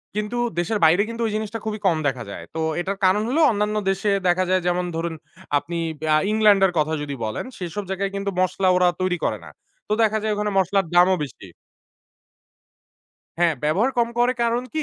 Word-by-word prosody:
কিন্তু 210 Hz, +3 st, -3 dB, 0.2 s
দেশের 210 Hz, +5 st, -1 dB
বাইরে 175 Hz, +5 st, +5 dB
কিন্তু 230 Hz, 0 st, -5 dB
ওই 215 Hz, -, -3 dB
জিনিসটা 215 Hz, +1 st, -3 dB
খুবই 215 Hz, 0 st, -3 dB
কম 170 Hz, -4 st, +3 dB
দেখা 130 Hz, -3 st, -2 dB
যায়। -, -, -7 dB
তো -, -, -2 dB, 0.2 s
এটার 190 Hz, +3 st, -3 dB
কারণ 190 Hz, +3 st, +3 dB
হল, 270 Hz, -, 0 dB
অন্যান্য 210 Hz, 0 st, -1 dB
দেশে 195 Hz, +2 st, 0 dB, 0.2 s
দেখা 180 Hz, +1 st, +3 dB
যায় 185 Hz, 0 st, +2 dB
যেমন 180 Hz, 0 st, 0 dB
ধরুন 165 Hz, 0 st, -2 dB, 0.4 s
আপনি 170 Hz, +4 st, -4 dB, 0.2 s
ব্যা 155 Hz, 0 st, -1 dB
আ -, -, +5 dB
ইংল্যান্ড 215 Hz, -2 st, +4 dB
এর 190 Hz, -, +2 dB
কথা 155 Hz, +1 st, 0 dB
যদি 145 Hz, -1 st, -4 dB
বলেন, 110 Hz, -, -4 dB
সেসব 180 Hz, +3 st, -5 dB
জায়গায় 195 Hz, +1 st, -2 dB
কিন্তু 200 Hz, 0 st, -2 dB
মসলা 185 Hz, +1 st, +1 dB
ওরা 180 Hz, 0 st, +4 dB
তৈরি 185 Hz, -1 st, 0 dB
করে -, -, 0 dB
না। -, -, -10 dB, 0.4 s
তো -, -, 0 dB
দেখা 220 Hz, 0 st, +2 dB
যায় 215 Hz, -1 st, 0 dB
ওখানে 210 Hz, 0 st, -1 dB
মশলার 190 Hz, 0 st, +2 dB
দামও 180 Hz, +2 st, +5 dB
বেশি 140 Hz, -, -9 dB, 1.9 s
হ্যাঁ, 170 Hz, -2 st, +3 dB
ব্যবহার 190 Hz, -, +2 dB
কম 235 Hz, -1 st, +3 dB
করে 245 Hz, +1 st, +3 dB
কারণ 235 Hz, +1 st, +1 dB
কি 310 Hz, -, 0 dB
195 Hz, 200 wpm, -22 LUFS, 175-210 Hz, 1.9 s, বাইরে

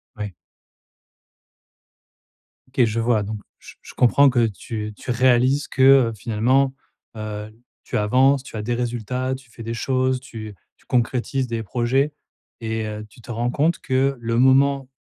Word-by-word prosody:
Ouais. 105 Hz, -3 st, -5 dB, 2.3 s
OK. 130 Hz, -1 st, +1 dB
Je 115 Hz, +1 st, -1 dB
vois. 115 Hz, -2 st, +2 dB
Donc, 105 Hz, +1 st, -5 dB, 0.2 s
je -, -, -14 dB
je -, -, -13 dB
comprends 135 Hz, +3 st, +5 dB
que 120 Hz, -2 st, +2 dB
tu 105 Hz, 0 st, -6 dB
tu 125 Hz, -, -4 dB
réalises 130 Hz, +3 st, +3 dB
que, 130 Hz, -, -3 dB, 0.3 s
heu, -, -, -6 dB
finalement, 125 Hz, +5 st, +1 dB, 0.4 s
heu, 105 Hz, 0 st, -6 dB, 0.3 s
tu -, -, -3 dB
avances, 130 Hz, +6 st, +3 dB
tu 115 Hz, -, -11 dB
as -, -, -3 dB
des 120 Hz, +3 st, -2 dB
résultats. 125 Hz, +2 st, -2 dB
Tu 130 Hz, -2 st, -14 dB
fais 115 Hz, 0 st, -11 dB
des 115 Hz, +1 st, -4 dB
choses, 130 Hz, +1 st, 0 dB
tu 110 Hz, -5 st, -9 dB, 0.2 s
tu -, -, -29 dB
concrétises 125 Hz, +2 st, 0 dB
des 115 Hz, -1 st, -3 dB
projets 130 Hz, +6 st, 0 dB, 0.5 s
et 110 Hz, -1 st, -2 dB
heu, 105 Hz, 0 st, -6 dB
tu 120 Hz, -, -18 dB
te 120 Hz, -, -9 dB
rends 120 Hz, +2 st, -1 dB
compte 160 Hz, +5 st, +1 dB
que 135 Hz, +1 st, 0 dB
le 115 Hz, 0 st, -1 dB
moment 135 Hz, +1 st, +4 dB
120 Hz, 160 wpm, -22 LUFS, 110-130 Hz, 2.3 s, comprends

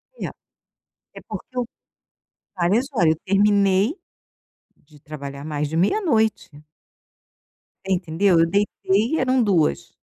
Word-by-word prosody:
É. -, -, -5 dB, 0.9 s
É -, -, -10 dB
porque 255 Hz, -, -8 dB
eu 250 Hz, -, 0 dB, 0.9 s
várias 195 Hz, +8 st, +1 dB
horas, 170 Hz, -, +3 dB
eu -, -, -24 dB
terminei 200 Hz, -, +3 dB, 0.8 s
de 150 Hz, 0 st, -22 dB
trabalhar 140 Hz, -1 st, -8 dB
mais 150 Hz, -1 st, -3 dB
de 160 Hz, -, -4 dB
meia-noite. 220 Hz, -, +1 dB, 1.4 s
Você 195 Hz, -, +1 dB
entendeu? 180 Hz, 0 st, +2 dB
Eu 165 Hz, -, +5 dB
deitei 205 Hz, -, 0 dB
eram 255 Hz, 0 st, +2 dB
2h00. 170 Hz, -, +1 dB
195 Hz, 115 wpm, -22 LUFS, 160-220 Hz, 1.4 s, Eu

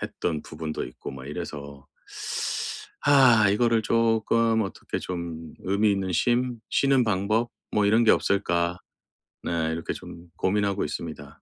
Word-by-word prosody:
했던 80 Hz, -3 st, -3 dB
부분도 80 Hz, 0 st, -5 dB
있고 60 Hz, -, -8 dB
막 65 Hz, -1 st, -9 dB
이래서 70 Hz, -3 st, -7 dB, 1.2 s
아 130 Hz, -7 st, +6 dB
이거를 115 Hz, +2 st, +2 dB
쪼끔 115 Hz, 0 st, +2 dB
어떻게 95 Hz, -, -5 dB
좀 85 Hz, -3 st, -6 dB
'의미 100 Hz, +3 st, +2 dB
있는 95 Hz, -2 st, -1 dB
쉼, 120 Hz, +6 st, +1 dB
쉬는 135 Hz, -2 st, +3 dB
방법, 110 Hz, +3 st, +1 dB, 0.2 s
뭐 105 Hz, -1 st, +2 dB
이런 110 Hz, +3 st, +4 dB
게 110 Hz, -, +7 dB
없을까?' 85 Hz, -3 st, +1 dB, 0.7 s
네 80 Hz, -1 st, -1 dB
이렇게 80 Hz, +1 st, -3 dB
좀 85 Hz, +1 st, -10 dB
고민하고 100 Hz, 0 st, +1 dB
있습니다. 75 Hz, -4 st, -7 dB
100 Hz, 265 characters per minute, -26 LUFS, 85-115 Hz, 1.2 s, 게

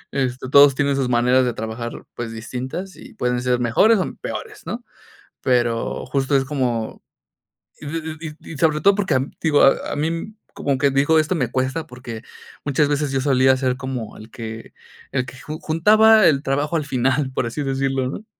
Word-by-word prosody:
Este, 130 Hz, -1 st, -2 dB
todos 140 Hz, -1 st, +7 dB
tienen 140 Hz, 0 st, +1 dB
sus 130 Hz, -2 st, 0 dB
maneras 125 Hz, +2 st, +3 dB
de 125 Hz, -2 st, 0 dB
trabajar, 110 Hz, +2 st, -6 dB
pues, 115 Hz, -1 st, -5 dB
distintas, 130 Hz, -, -6 dB
y 260 Hz, -3 st, -14 dB
pueden 125 Hz, -8 st, -1 dB
ser 125 Hz, -1 st, +1 dB
mejores, 125 Hz, -, +4 dB
o, 185 Hz, -, -2 dB
peores, 425 Hz, -3 st, -6 dB
¿no? 240 Hz, +1 st, -5 dB, 0.6 s
Pero 120 Hz, -2 st, 0 dB
justo 135 Hz, +2 st, 0 dB
es 135 Hz, -, 0 dB
como 125 Hz, -6 st, -2 dB, 0.8 s
y -, -, -10 dB
id 160 Hz, 0 st, -5 dB
d 155 Hz, -2 st, -7 dB
d 165 Hz, -, -10 dB
sobre 155 Hz, -1 st, +2 dB
todo 200 Hz, -, +5 dB
porque, 195 Hz, -6 st, 0 dB
te 135 Hz, -, -3 dB, 0.2 s
digo, 145 Hz, -2 st, +4 dB
a 135 Hz, -, +3 dB
a -, -, -3 dB
mí 165 Hz, +8 st, -3 dB, 0.2 s
como 140 Hz, -2 st, -1 dB
quien 140 Hz, 0 st, +2 dB
dijo, 145 Hz, +4 st, +4 dB
esto 155 Hz, +4 st, 0 dB
me 125 Hz, -8 st, -1 dB
cuesta, 130 Hz, +5 st, -2 dB
porque 125 Hz, -3 st, -9 dB, 0.4 s
muchas 145 Hz, +1 st, +2 dB
veces 145 Hz, -1 st, 0 dB
yo 135 Hz, -, +1 dB
solía 130 Hz, -1 st, +4 dB
ser 130 Hz, -1 st, -1 dB
como, 130 Hz, -4 st, -5 dB
el 110 Hz, -, -12 dB
que 115 Hz, -1 st, -8 dB, 0.4 s
el 130 Hz, -, 0 dB
que 130 Hz, -, -11 dB
ju 155 Hz, +2 st, -7 dB
juntaba 215 Hz, +6 st, +5 dB
el 140 Hz, -3 st, +2 dB
trabajo 145 Hz, +4 st, -1 dB
al 160 Hz, -, +1 dB
final, 130 Hz, +1 st, 0 dB
por 130 Hz, -, -1 dB
así 130 Hz, +6 st, -3 dB
decirlo, 135 Hz, -1 st, -1 dB
¿no? 215 Hz, -, -7 dB
135 Hz, 190 wpm, -21 LUFS, 125-155 Hz, 0.8 s, todos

